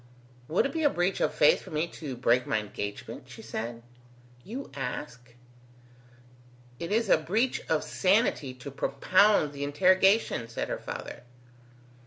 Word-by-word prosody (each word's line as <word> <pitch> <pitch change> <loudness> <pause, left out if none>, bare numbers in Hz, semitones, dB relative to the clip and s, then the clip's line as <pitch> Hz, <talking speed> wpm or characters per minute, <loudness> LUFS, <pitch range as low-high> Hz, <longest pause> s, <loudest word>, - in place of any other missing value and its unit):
"Would 165 - +2
it 275 - -2
be 325 - -1
a 295 - +5
breach 180 -4 0
of - - +2
faith 150 -1 +4
for - - -12
me 155 +1 0
to 145 -5 -7
break 120 0 +2
my - - +1
engagement?" 100 -1 -6
she - - -11
said. 115 +1 -5 0.6
"You 255 +7 -7
ask?" 125 -2 -6 1.4
"It 170 - -5
is 225 +1 +2
a 170 - +5
breach 220 +11 0
of 160 -1 +1
sanity 190 - +1
to 130 +2 -9
propound 155 +4 +3
the 140 0 -5
interrogation," 185 - +3
said 115 - -4
her - - -3
father. - - -7
155 Hz, 150 wpm, -28 LUFS, 125-195 Hz, 1.4 s, a